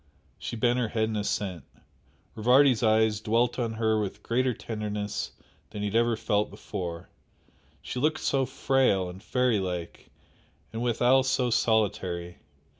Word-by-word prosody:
She - - -5
bent 120 +2 +2
her 120 - 0
head 110 +1 0
in 110 - -3
assent. 100 -5 -2 0.7
Rivardi's 125 +2 +4
eyes 110 -1 +3
dwelt 120 +3 +1
on 115 -2 -1
her 110 -1 +1
with 100 - -5
greater 125 +2 +1
tenderness 105 -2 -4 0.4
than 105 -1 -6
he 105 - 0
had 105 - -5
ever 115 -1 +3
felt 105 -1 0
before, 85 -5 -6 0.7
she 125 - -4
looked 155 +3 +1
so 135 -2 +1
frail 130 -8 +1
and 90 +2 -10
fairy 125 -1 +1
like, 90 -3 -5 0.6
and 115 - -4
withal 125 +2 +3
so 130 -2 0
solitary. 95 -7 0
110 Hz, 145 wpm, -27 LUFS, 105-125 Hz, 0.7 s, Rivardi's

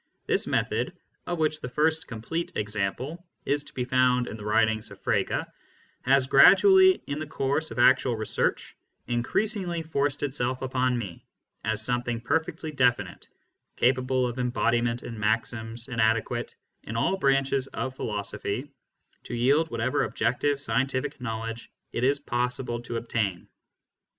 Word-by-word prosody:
This - - +2
method, - - -1 0.3
of 175 - -2
which 155 -1 0
the 125 - -5
first 155 +4 +1
complete 125 +9 -4
example 110 - -3 0.2
is 145 0 0
to - - -12
be 125 - -1
found 125 -1 +3
in - - -6
the 105 - -9
writings 110 0 +1
of - - -13
Frege, - - 0 0.6
has 135 0 +3
gradually, 375 - +7
in 145 +1 -4
the 155 - -5
course 145 +3 -1
of - - -8
actual 125 0 +4
research, 110 -1 -1 0.3
increasingly 175 - 0
forced 145 -2 -1
itself 130 -2 -1
upon 130 -1 +1
me 100 -7 -6 0.4
as 110 0 +1
something 120 -1 -1
perfectly 160 +5 -2
definite, 120 -9 0 0.5
capable 130 0 +2
of 125 +1 -4
embodiment 120 -1 0
in 115 -2 -7
maxims, 115 +2 -2
and 120 -3 -2
adequate, 115 +2 0 0.3
in 110 - -7
all 190 +11 +1
branches 135 -3 +2
of 130 -1 -4
philosophy, 105 +4 -3 0.5
to - - -5
yield 140 +7 +3
whatever 115 +1 0
objective 140 +3 0
scientific 135 0 -1
knowledge 115 0 -5 0.2
it 120 - -2
is 140 +2 +3
possible 125 -2 -2
to 120 -1 -4
obtain. 110 -6 -2
125 Hz, 140 wpm, -27 LUFS, 115-140 Hz, 0.6 s, gradually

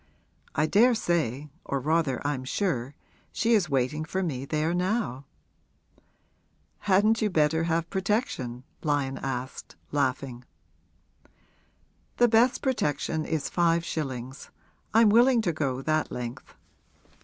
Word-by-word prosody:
I 155 - +2
daresay 170 - +2
or 140 - -2
rather 155 -1 0
I'm 145 -3 -1
sure 135 - -2 0.4
she 230 +3 +1
is 195 -6 +3
waiting 140 +3 0
for 190 +4 -2
me 135 -6 -3
there 155 +3 0
now.' 180 - -1 1.5
'Hadn't 210 +3 +3
you 215 - +2
better 160 -1 +2
have 165 0 0
protection?' 190 - -2 0.2
Lyon 145 -3 -1
asked, 130 -1 -5 0.2
laughing. 130 -3 -1 1.7
'The 240 - +5
best 235 +3 +3
protection 160 - -1
is 160 -3 -2
five 170 -1 +1
shillings 130 -5 -5 0.4
I'm 225 0 +5
willing 240 +3 +5
to 175 -6 0
go 135 -4 -2
that 155 +1 0
length. 125 +1 -7
155 Hz, 115 wpm, -27 LUFS, 135-195 Hz, 1.7 s, The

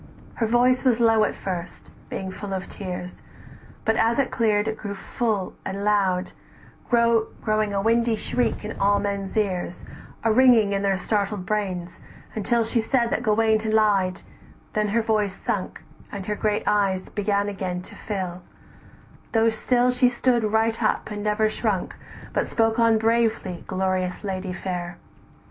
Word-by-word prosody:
Her 225 - -1
voice 245 +2 +3
was 245 -3 +3
low 225 -2 +4
at - - -3
first, 180 -2 -6 0.2
being 190 -1 -4
full 195 +1 -6
of 190 0 -5
tears, 180 -2 -7 0.6
But 220 0 +2
as 230 +1 +2
it 275 -2 +1
cleared, 215 -2 +2
it 220 - -1
grew 200 -1 -5
full 210 -1 -2 0.2
loud 200 -2 +2
and - - -15 0.6
shrill, 235 -2 +3 0.2
Growing 215 -1 +1
a 195 0 -1
windy 230 +1 +3
shriek 240 0 -1
in 215 - -6
all 200 +1 +4
men's 200 0 -3
ears, 185 -4 -1 0.4
A 225 - +3
ringing 230 -4 +5
in 195 - 0
their 195 -1 +1
startled 200 -1 -1
brains, 185 -5 -3 0.3
until 230 +2 +1
She 225 +1 0
said 235 +1 +1
that - - 0
Gauwaine 220 -1 +2
lied, 200 -4 +2 0.5
then 210 -1 +1
her 225 +3 +1
voice 210 -3 0
sunk, 205 -5 -3 0.3
And 200 -2 -6
her 210 - -1
great 210 0 0
eyes 195 -3 +1
began 205 0 0
again 185 -3 -3
to - - -13
fill, 185 -4 -4 0.9
Though 225 0 +4
still 245 +3 +2
she 250 0 +3
stood 240 -2 +1
right 225 +1 +1
up, 215 - 0
and 205 0 -4
never 215 +1 +2
shrunk, 215 -3 -2 0.4
But - - 0
spoke 225 0 +1
on 230 -1 +5
bravely, 225 -5 0
glorious 185 -1 -1
lady 190 -2 -3
fair! 175 -2 -4
210 Hz, 160 wpm, -24 LUFS, 195-225 Hz, 0.9 s, ringing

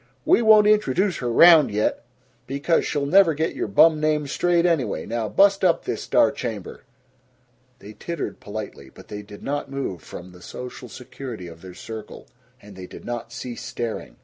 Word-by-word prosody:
We - - +4
won't 215 -2 +6
introduce 200 -3 +2
her 120 -2 -3
round 165 +3 +7
yet, 105 +3 -1 0.4
because 140 +5 0
she'll 145 -1 -1
never 170 +1 +4
get 160 +2 -1
your - - -3
bum 155 +10 +5
names 150 -2 0
straight 175 -1 +1
anyway. 165 -7 0
Now 115 -1 -3
bust 195 - +3
up 175 -3 +2
this - - -3
star 140 - +3
chamber!" 115 -9 -6 1.0
They 105 -3 -12
tittered 170 +9 -6
politely, 100 -10 -8
but - - -16
they 105 0 -6
did 105 0 -13
not 145 0 -3
move 135 - -5
from 90 +1 -10
the 90 0 -16
social 125 +2 -9
security 125 -5 -9
of 85 -1 -12
their 90 -1 -11
circle, 110 -2 -9 0.3
and 100 -1 -14
they 95 -1 -9
did - - -12
not 120 -1 -5
cease 120 0 -7
staring. 115 -2 -5
130 Hz, 175 wpm, -23 LUFS, 105-165 Hz, 1.0 s, round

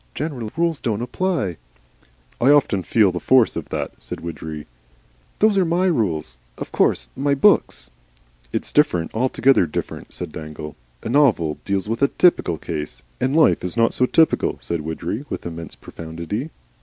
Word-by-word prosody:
General 130 -7 -4
rules 165 -2 +1
don't 115 -2 -2
apply 130 - -1 0.4
" - - -28
"I 130 - +5
often 145 -9 +4
feel 100 +2 +3
the 90 - -4
force 130 +1 +4
of - - -5
that," - - -3
said - - -7
Widgery. 80 -2 -6 0.7
"Those 210 -2 +4
are - - +4
my 175 +2 +1
rules. 85 - -1 0.2
Of - - -7
course 60 - +1
my 140 0 +1
books 140 - +2 0.3
" - - -34
"It's - - -2
different, 90 - +2
altogether 130 -3 +3
different," 75 - -5
said - - -6
Dangle. 75 -1 -8 0.3
"A - - -4
novel 115 - +3
deals 100 0 -1
with 115 +1 -2 0.2
typical 170 - +3
cases." 75 -8 -5 0.2
"And 130 +3 0
life 160 - +4
is 90 +4 -3
not 115 0 +4 0.2
typical," 160 -1 +3
said 85 -2 -3
Widgery, 85 - -4
with - - -5
immense 85 -2 -7
profundity. 85 - -6
100 Hz, 160 wpm, -21 LUFS, -, 0.7 s, I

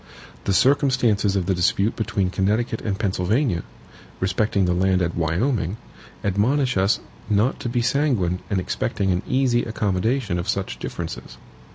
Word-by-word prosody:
The 100 - +1
circumstances 125 -5 +3
of 95 -3 0
the 95 - +1
dispute 100 +4 +1
between 100 -4 -1
Connecticut 110 +5 0
and 100 -3 -2
Pennsylvania, 100 - 0 0.6
respecting 95 +1 +1
the 90 - +1
land 95 +1 +2
at 85 -2 0
Wyoming, 90 - 0 0.5
admonish 125 +7 +1
us 95 +3 +2 0.3
not 105 +5 +2
to 120 - -3
be 120 0 0
sanguine 120 - +1
in 100 - +1
expecting 95 +1 -1
an 90 0 0
easy 130 -2 +2
accommodation 110 -1 -1
of 85 +4 -4
such 100 -2 -2
differences. - - -6
100 Hz, 145 wpm, -23 LUFS, 90-120 Hz, 0.6 s, circumstances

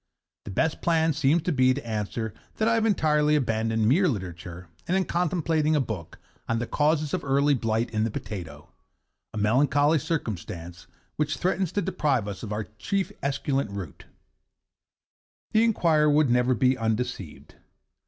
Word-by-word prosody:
The - - -7
best 160 - 0
plan 160 -1 +2
seems 150 +3 +2
to 180 - 0
be 130 -3 +3
to 140 -4 -7
answer 110 0 -3 0.2
that 220 - 0
I 230 - +3
have 225 0 +2
entirely 150 -6 +2
abandoned 115 -4 +1
mere 175 - +4
literature, 90 - -5 0.2
and 185 - +2
am 190 - +1
contemplating 160 -3 +1
a - - +3
book 110 - -5 0.3
on 115 - +1
'The 120 - -2
Causes 150 +2 +1
of - - -1
Early 140 +1 +3
Blight 115 -2 -1
in 110 -1 0
the 115 - 0
Potato,' 85 -9 -7 0.6
a - - -7
melancholy 145 +8 +3
circumstance 90 - -5 0.3
which 150 0 -1
threatens 185 -1 0
to 205 - 0
deprive 135 -10 0
us 100 -2 -6
of 110 - -6
our 105 +1 -2 0.2
chief 195 - -1
esculent 140 -2 -1
root. 100 -7 -8 1.5
The 220 - +4
inquirer 165 -9 +3
would 150 -3 +3
never 125 +1 +3
be 130 +2 +3
undeceived. 110 - -4
135 Hz, 160 wpm, -26 LUFS, 110-155 Hz, 1.5 s, mere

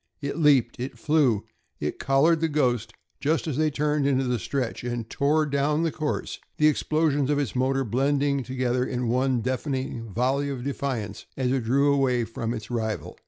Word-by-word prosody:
It 140 +3 -4
leaped, 135 -7 +3
it 130 +2 -5
flew. 145 -9 +2 0.3
It 75 - -3
collared 155 +4 +3
the 165 - +3
"Ghost" 125 -7 0 0.3
just 155 +3 0
as 155 -5 -2
they 155 0 +3
turned 150 -1 0
into 135 -1 +2
the 125 -2 0
stretch, 125 +1 -3
and 120 -2 -3
tore 150 +5 +2
down 145 +2 +1
the 165 - +1
course, 155 -1 -3 0.2
the 150 - +5
explosions 150 -2 +1
of 145 - +2
its 140 -5 -2
motor 135 +1 +1
blending 140 +4 +1
together 125 0 -1
in 125 -2 -2
one 130 0 +1
deafening 130 -3 -3
volley 130 +6 0
of 130 -3 -4
defiance 130 -7 -3
as 130 -2 0
it 130 -3 0
drew 140 +4 +3
away 130 -3 +2
from 115 0 -4
its 115 0 -6
rival. 110 -2 -3
135 Hz, 180 wpm, -26 LUFS, 125-145 Hz, 0.3 s, the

